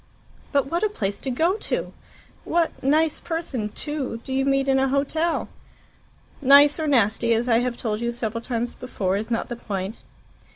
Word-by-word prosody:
"But 280 Hz, -2 st, +2 dB
what 335 Hz, +5 st, -2 dB
a 430 Hz, -, +2 dB
place 200 Hz, -, -3 dB
to 270 Hz, -, -4 dB
go 320 Hz, +8 st, +2 dB
to! -, -, -2 dB, 0.5 s
What 335 Hz, -1 st, +1 dB
nice 310 Hz, +3 st, +2 dB
person, 295 Hz, -10 st, -3 dB
too, 275 Hz, 0 st, -4 dB
do 265 Hz, -, -5 dB
you 270 Hz, 0 st, +1 dB
meet 275 Hz, 0 st, +2 dB
in 265 Hz, 0 st, +3 dB
a 270 Hz, -, +2 dB
hotel?" 290 Hz, +5 st, 0 dB, 0.9 s
"Nice 285 Hz, +3 st, +7 dB
or 315 Hz, -, -1 dB
nasty, 230 Hz, -3 st, +3 dB
as 235 Hz, +2 st, -1 dB
I 230 Hz, -1 st, +4 dB
have 245 Hz, -1 st, -2 dB
told 215 Hz, -2 st, -2 dB
you 235 Hz, 0 st, 0 dB
several 230 Hz, -1 st, -3 dB
times 235 Hz, 0 st, -3 dB
before, 195 Hz, -7 st, -2 dB
is 215 Hz, +3 st, -3 dB
not 230 Hz, -1 st, -1 dB
the 240 Hz, -, -5 dB
point. 200 Hz, -2 st, -4 dB
260 Hz, 180 wpm, -24 LUFS, 230-290 Hz, 0.9 s, Nice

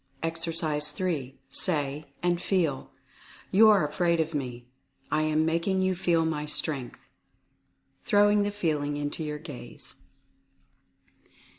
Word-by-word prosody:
Exercise 165 Hz, -2 st, 0 dB
3. 145 Hz, -5 st, -3 dB
Say, 150 Hz, -3 st, +1 dB, 0.2 s
and 175 Hz, -1 st, +1 dB
feel, 170 Hz, -8 st, 0 dB, 0.6 s
"You 220 Hz, +3 st, +7 dB
are 200 Hz, -8 st, +5 dB
afraid 170 Hz, +3 st, +1 dB
of 160 Hz, 0 st, 0 dB
me 125 Hz, -4 st, -4 dB, 0.2 s
— -, -, -47 dB
I 155 Hz, -, +2 dB
am 155 Hz, 0 st, +2 dB
making 170 Hz, +4 st, +1 dB
you 185 Hz, 0 st, +2 dB
feel 170 Hz, -3 st, +1 dB
my 150 Hz, -2 st, -2 dB
Strength," 140 Hz, -4 st, -3 dB, 1.0 s
throwing 205 Hz, 0 st, +4 dB
the 205 Hz, -, +1 dB
feeling 150 Hz, -7 st, -1 dB
into 145 Hz, +2 st, -3 dB
your 150 Hz, -1 st, -3 dB
gaze. 145 Hz, -6 st, -8 dB
160 Hz, 125 wpm, -28 LUFS, 150-175 Hz, 1.0 s, You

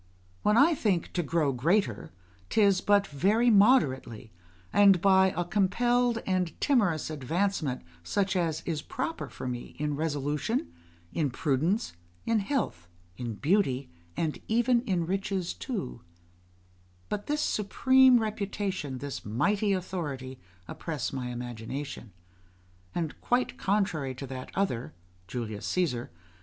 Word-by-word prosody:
When 210 Hz, +1 st, +3 dB
I 310 Hz, +6 st, +6 dB
think 200 Hz, -, 0 dB
to 175 Hz, -, +1 dB
grow 155 Hz, -3 st, +1 dB
greater, 125 Hz, -, +1 dB, 0.4 s
'tis 200 Hz, -4 st, +4 dB
but 205 Hz, -1 st, +4 dB
very 205 Hz, -, +2 dB
moderately, 140 Hz, -, +3 dB, 0.4 s
and 200 Hz, -3 st, +6 dB
by 190 Hz, +1 st, +5 dB
a 175 Hz, -, 0 dB
compelled 235 Hz, +6 st, +2 dB
and 185 Hz, -4 st, -1 dB
timorous 200 Hz, -, +2 dB
advancement, 155 Hz, 0 st, -1 dB, 0.2 s
such 195 Hz, -, 0 dB
as 165 Hz, -3 st, 0 dB
is 160 Hz, -3 st, -2 dB
proper 295 Hz, -, -4 dB
for -, -, -7 dB
me 120 Hz, -1 st, -5 dB
in 150 Hz, 0 st, -1 dB
resolution, 145 Hz, -, -1 dB, 0.4 s
in 155 Hz, -4 st, +1 dB
prudence, 155 Hz, -, 0 dB, 0.3 s
in 230 Hz, -1 st, +2 dB
health, 200 Hz, -, -2 dB, 0.3 s
in 115 Hz, 0 st, -5 dB
beauty, 140 Hz, -, +1 dB, 0.3 s
and 160 Hz, -2 st, -1 dB
even 235 Hz, +2 st, +3 dB
in 180 Hz, -5 st, 0 dB
riches 190 Hz, 0 st, -2 dB
too; 60 Hz, -7 st, -5 dB, 1.1 s
but 205 Hz, 0 st, -4 dB
this 295 Hz, +1 st, 0 dB
supreme 260 Hz, +4 st, +4 dB
reputation, 200 Hz, -, -3 dB
this 140 Hz, +1 st, -6 dB
mighty 200 Hz, -, +1 dB
authority, 150 Hz, -9 st, -3 dB, 0.3 s
oppress 145 Hz, -8 st, -4 dB
my 130 Hz, -2 st, -3 dB
imagination; 120 Hz, +1 st, -6 dB, 0.8 s
and, 165 Hz, -3 st, -3 dB
quite 250 Hz, +1 st, +1 dB
contrary 180 Hz, -10 st, 0 dB
to 135 Hz, -, -6 dB
that 130 Hz, -1 st, -7 dB
other, 125 Hz, -12 st, -1 dB, 0.3 s
[Julius 110 Hz, -3 st, -4 dB
Caesar. 145 Hz, -10 st, 0 dB
175 Hz, 125 wpm, -29 LUFS, 135-205 Hz, 1.1 s, I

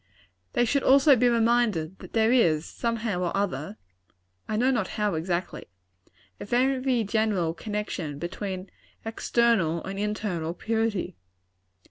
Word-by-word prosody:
They 240 Hz, -, +3 dB
should 280 Hz, +4 st, +1 dB
also 275 Hz, +2 st, +6 dB
be 245 Hz, +1 st, +3 dB
reminded 225 Hz, -7 st, +1 dB
that -, -, -12 dB
there 225 Hz, 0 st, +3 dB
is, 170 Hz, -11 st, +3 dB
somehow 230 Hz, -5 st, -2 dB
or 180 Hz, +1 st, -1 dB
other, 150 Hz, -, -2 dB, 0.7 s
(I 215 Hz, -, -1 dB
know 255 Hz, +4 st, +3 dB
not 220 Hz, -7 st, 0 dB
how, 210 Hz, -2 st, +1 dB
exactly,) 175 Hz, +2 st, -3 dB, 0.7 s
a -, -, -6 dB
very 255 Hz, +1 st, +1 dB
general 205 Hz, -6 st, 0 dB
connection 195 Hz, -7 st, -4 dB
between 185 Hz, +3 st, -5 dB, 0.3 s
external 225 Hz, -7 st, +1 dB
and 195 Hz, +1 st, -5 dB
internal 200 Hz, -6 st, -2 dB
purity. 225 Hz, -, -2 dB
210 Hz, 125 wpm, -26 LUFS, 175-235 Hz, 0.7 s, also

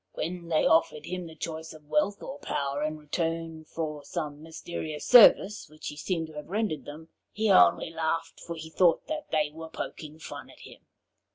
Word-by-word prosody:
When 175 Hz, 0 st, -4 dB
they 160 Hz, -2 st, +2 dB
offered 155 Hz, -2 st, +3 dB
him 180 Hz, -1 st, -4 dB
the 160 Hz, -, -11 dB
choice 160 Hz, 0 st, -5 dB
of 155 Hz, -1 st, -15 dB
wealth 200 Hz, +6 st, 0 dB
or 275 Hz, +2 st, -7 dB
power 140 Hz, -, -2 dB
in 155 Hz, +1 st, -1 dB
return 165 Hz, +1 st, -3 dB
for 150 Hz, -2 st, -4 dB
some 145 Hz, 0 st, -5 dB
mysterious 160 Hz, -1 st, -6 dB
service 210 Hz, -, +7 dB
which 155 Hz, 0 st, -7 dB
he 150 Hz, -, -8 dB
seemed 165 Hz, +2 st, -2 dB
to 160 Hz, -, -12 dB
have 150 Hz, +1 st, -8 dB
rendered 205 Hz, -5 st, -1 dB
them, 160 Hz, +2 st, -10 dB, 0.2 s
he 215 Hz, 0 st, +1 dB
only 90 Hz, -, +5 dB
laughed, 165 Hz, 0 st, -2 dB
for 170 Hz, -, -6 dB
he 160 Hz, 0 st, -8 dB
thought 175 Hz, -1 st, +3 dB
that 310 Hz, -1 st, -5 dB
they 150 Hz, -2 st, +1 dB
were 160 Hz, 0 st, -8 dB
poking 155 Hz, -1 st, -7 dB
fun 160 Hz, -, -9 dB
at -, -, -16 dB
him. -, -, -13 dB
160 Hz, 190 wpm, -28 LUFS, 155-170 Hz, 0.2 s, service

